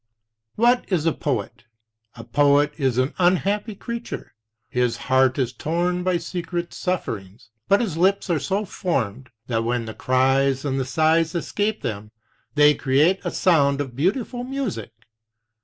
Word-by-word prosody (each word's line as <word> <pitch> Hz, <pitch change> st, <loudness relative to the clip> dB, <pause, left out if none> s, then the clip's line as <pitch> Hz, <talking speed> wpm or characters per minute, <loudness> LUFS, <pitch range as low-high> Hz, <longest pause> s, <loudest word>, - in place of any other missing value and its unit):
"What 240 Hz, 0 st, +2 dB
is 170 Hz, -4 st, +1 dB
a 165 Hz, -, +4 dB
poet? 120 Hz, -3 st, -3 dB, 0.5 s
A 115 Hz, -, -9 dB
poet 145 Hz, +4 st, +3 dB
is 130 Hz, -4 st, +1 dB
an 130 Hz, +2 st, +1 dB
unhappy 200 Hz, +4 st, +1 dB
creature; 235 Hz, +3 st, -6 dB, 0.3 s
his 125 Hz, -1 st, 0 dB
heart 130 Hz, +1 st, +2 dB
is 130 Hz, -3 st, -1 dB
torn 175 Hz, +3 st, -1 dB
by 180 Hz, -1 st, +1 dB
secret 170 Hz, 0 st, -4 dB
sufferings, 110 Hz, -, -4 dB, 0.2 s
but 200 Hz, +3 st, +4 dB
his 190 Hz, -9 st, -2 dB
lips 190 Hz, +3 st, +2 dB
are 170 Hz, -4 st, +1 dB
so 200 Hz, +7 st, -1 dB
formed 130 Hz, -, -3 dB, 0.2 s
that 115 Hz, -2 st, -1 dB
when 120 Hz, 0 st, -1 dB
the 110 Hz, -, -6 dB
cries 135 Hz, +2 st, +2 dB
and 135 Hz, -1 st, -1 dB
the 130 Hz, -, -1 dB
sighs 160 Hz, +5 st, +2 dB
escape 210 Hz, +5 st, -2 dB
them, 105 Hz, -2 st, -4 dB, 0.5 s
they 150 Hz, 0 st, +6 dB
create 150 Hz, +7 st, +2 dB
a -, -, -1 dB
sound 140 Hz, -6 st, +3 dB
of 135 Hz, -4 st, -4 dB
beautiful 225 Hz, -, -1 dB
music. 250 Hz, -, -4 dB
150 Hz, 150 wpm, -23 LUFS, 130-185 Hz, 0.5 s, they